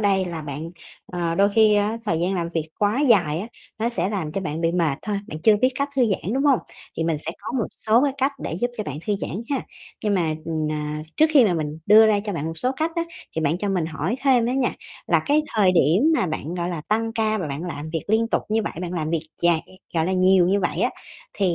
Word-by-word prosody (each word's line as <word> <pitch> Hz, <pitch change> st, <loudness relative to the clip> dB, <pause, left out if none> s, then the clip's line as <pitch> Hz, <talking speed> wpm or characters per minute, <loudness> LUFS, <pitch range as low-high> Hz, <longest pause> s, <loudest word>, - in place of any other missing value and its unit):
đây 195 Hz, -2 st, +3 dB
là 170 Hz, -3 st, -5 dB
bạn, 150 Hz, +3 st, -6 dB, 0.4 s
ờ, 170 Hz, -2 st, -2 dB
đôi 200 Hz, +2 st, +4 dB
khi 220 Hz, -1 st, +5 dB
á 210 Hz, +2 st, +1 dB
thời 165 Hz, -6 st, 0 dB
gian 185 Hz, +3 st, 0 dB
làm 170 Hz, -2 st, -1 dB
việc 160 Hz, -1 st, -1 dB
quá 210 Hz, +5 st, +2 dB
dài 190 Hz, -, +3 dB
á 210 Hz, -, -5 dB, 0.3 s
nó 230 Hz, -, +1 dB
sẽ 190 Hz, -6 st, -1 dB
làm 175 Hz, -8 st, -3 dB
cho 195 Hz, -, -2 dB
bạn 160 Hz, -3 st, -4 dB
bị 165 Hz, 0 st, +1 dB
mệt 165 Hz, -6 st, +1 dB
thôi, 210 Hz, -1 st, -2 dB
bạn 155 Hz, -, -6 dB
chưa 215 Hz, -1 st, +6 dB
biết 255 Hz, +5 st, +3 dB
cách 280 Hz, +2 st, -1 dB
thư 260 Hz, -, +4 dB
giãn, 195 Hz, 0 st, -1 dB
đúng 275 Hz, -, 0 dB
hông? 275 Hz, -4 st, +5 dB, 0.4 s
Thì 165 Hz, -, -1 dB
mình 165 Hz, -1 st, +1 dB
sẽ 155 Hz, -, -4 dB
có -, -, -6 dB
một 225 Hz, -, 0 dB, 0.2 s
số 225 Hz, +3 st, +5 dB
cái 280 Hz, -, +1 dB
cách 270 Hz, +1 st, +1 dB
để -, -, -3 dB
giúp 245 Hz, 0 st, +1 dB
cho 215 Hz, -, -3 dB
bạn 145 Hz, 0 st, -5 dB
thư 210 Hz, -, +1 dB
giãn 205 Hz, +6 st, -4 dB
ha. 275 Hz, -3 st, +1 dB, 0.4 s
Nhưng 210 Hz, -1 st, +2 dB
mà, 165 Hz, -4 st, +1 dB
ờ, 165 Hz, -, -3 dB, 0.2 s
à, 150 Hz, 0 st, -3 dB
trước 315 Hz, -, +6 dB
khi 275 Hz, -5 st, +7 dB
mà 190 Hz, -5 st, +2 dB
mình 155 Hz, -1 st, -3 dB
đưa 215 Hz, +2 st, +8 dB
ra 210 Hz, -2 st, +3 dB
cho 205 Hz, 0 st, -4 dB
bạn 165 Hz, -5 st, -3 dB
một 165 Hz, 0 st, -5 dB
số 255 Hz, -, 0 dB
cách 320 Hz, +1 st, 0 dB
á 335 Hz, -, 0 dB, 0.3 s
thì 160 Hz, -, +1 dB
bạn 155 Hz, +3 st, +1 dB
cho 205 Hz, -, -2 dB
mình 180 Hz, -5 st, 0 dB
hỏi 165 Hz, +5 st, -2 dB
thêm 255 Hz, -4 st, +4 dB
đó 245 Hz, -, 0 dB
nha, 260 Hz, -1 st, +1 dB, 0.3 s
là -, -, +3 dB
cái 300 Hz, +2 st, +3 dB
thời 195 Hz, -3 st, +5 dB
điểm 170 Hz, -, +4 dB
mà 190 Hz, -, +1 dB
bạn, 155 Hz, +1 st, -4 dB
gọi 175 Hz, -1 st, -2 dB
là, 170 Hz, -3 st, -3 dB
tăng 225 Hz, +1 st, 0 dB
ca 220 Hz, -1 st, +1 dB
và 165 Hz, -6 st, -3 dB
bạn 140 Hz, +4 st, -4 dB
làm 155 Hz, -3 st, -5 dB
việc 165 Hz, -, -2 dB
liên 225 Hz, +2 st, +2 dB
tục -, -, 0 dB
như 220 Hz, +1 st, +1 dB
vậy, -, -, -3 dB
bạn 180 Hz, -1 st, -4 dB
làm 160 Hz, -3 st, -2 dB
việc 165 Hz, -1 st, -1 dB, 0.2 s
dài 170 Hz, -2 st, +4 dB
vậy, 185 Hz, -, -17 dB, 0.2 s
gọi 160 Hz, 0 st, +1 dB
là, 190 Hz, -, 0 dB
nhiều 185 Hz, -1 st, +4 dB
như 200 Hz, +1 st, +2 dB
vậy 180 Hz, -, -1 dB
á -, -, +2 dB, 0.4 s
thì 185 Hz, -3 st, +1 dB
185 Hz, 275 wpm, -23 LUFS, 165-220 Hz, 0.4 s, đưa